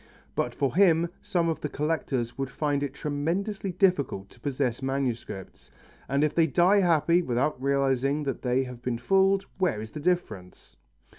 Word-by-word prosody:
But - - -2
for 140 - 0
him 170 -3 +4
some 175 -4 0
of 165 - -2
the 150 - -3
collectors 140 -6 -2
would 135 -1 -3
find 145 0 -1
it 140 -1 -3
tremendously 175 +8 -2
difficult 155 - +1
to - - -18
possess 130 -2 -2
masterpieces, 130 -7 -4 0.4
and 140 +2 +2
if 155 -1 +1
they 165 -1 +3
die 180 +7 +4
happy 170 0 +3
without 130 -1 -1
realizing 140 +1 +1
that 135 -2 -3
they 125 +1 +1
have 125 -2 -9
been 125 -2 -2
fooled, 195 +8 +3
where 180 - +1
is 110 +1 -7
the 150 - -7
difference? 155 - -3
145 Hz, 165 wpm, -27 LUFS, 130-170 Hz, 0.4 s, him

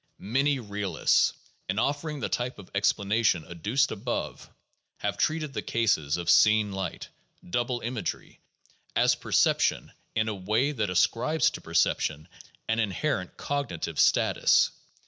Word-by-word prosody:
Many 135 +7 +1
realists, 100 -6 +1 0.4
in 95 - -1
offering 145 +4 -1
the - - -1
type 125 +1 -2
of 100 -3 -13
explanation 100 -2 +1
ad 85 -2 -10
duced 125 - +1
above, 115 +4 -4 0.5
have - - -2
treated 155 -3 -1
the - - -3
cases 90 -11 0
of 85 -1 -6
seen 105 +3 +5
light, 95 -1 -5 0.4
doubled 120 +5 -1
imagery, 120 -1 -5 0.6
as - - +4
perception - - +1 0.2
in 110 0 +1
a 110 - -1
way 105 +8 0
that 110 -8 -2
ascribes 120 - +2
to - - -8
perception 80 +1 0 0.4
an 115 0 0
inherent 105 -1 -2
cognitive 140 - -3
status. - - +4
110 Hz, 130 wpm, -27 LUFS, 95-130 Hz, 0.6 s, seen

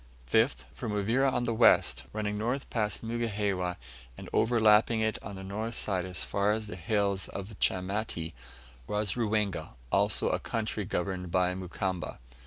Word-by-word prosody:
5th. 115 +6 +3
From 115 -4 -4
Uvira 115 +7 +2
on 125 - 0
the 115 - 0
west, 115 +1 +4
running 105 -1 -2
north 120 +6 -1
past 105 -2 -1
Mugihewa, 105 -6 -1 0.4
and - - -8
overlapping 110 -1 +4
it 110 0 0
on 100 +1 -7
the 95 - -7
north 110 +4 -4
side 95 -3 -1
as 90 -1 -4
far 100 +1 +1
as 110 0 -2
the 100 - -7
hills 100 +2 0
of 100 +2 -7
Chamati, 95 -3 -1 0.5
was 105 -2 +1
Ruwenga, 105 - -1 0.2
also - - +3
a - - +1
country 110 -2 -2
governed 90 0 -2
by 90 +1 +2
Mukamba. 90 -1 -3
105 Hz, 155 wpm, -30 LUFS, 95-110 Hz, 0.5 s, west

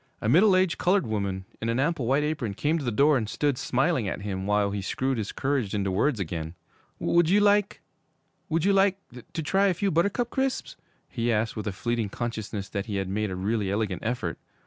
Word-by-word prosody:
A - - -3
middle 185 - +5
aged 185 -2 +2
colored 185 +1 +2
woman, 100 -3 -2 0.2
in 115 - -1
an 115 +2 0
ample 145 -3 0
white 140 +4 +2
apron, 145 -9 -2
came 155 +8 0
to - - -5
the 120 - -1
door 140 +6 +4
and 110 -2 -4
stood 145 +1 0
smiling 130 - +1
at 95 +1 -4
him 95 -1 -3
while 105 -1 +2
he 100 0 -3
screwed 130 +6 -1
his 105 - -3
courage 130 -7 -1
into 100 -2 0
words 110 +6 +1
again. 80 -2 -4 0.4
'Would 170 -1 +2
you 200 +3 +5
like 205 -1 +3 0.7
would 165 +1 +1
you 200 - +4
like 195 0 +4 0.3
to 160 - -3
try 195 +6 +3
a 185 - +1
few 200 +3 0
Buttercup 200 +9 +1
Crisps?' 265 -1 -1 0.3
he 120 0 -1
asked, 110 0 0
with 110 -1 -4
a - - 0
fleeting 115 +2 -2
consciousness 110 -3 -4
that 100 +1 -4
he 105 - -3
had 95 -1 -2
made 105 +2 -1
a 95 - -4
really 100 +2 -1
elegant 100 -3 -1
effort. 110 -8 -2
120 Hz, 215 wpm, -26 LUFS, 100-165 Hz, 0.7 s, middle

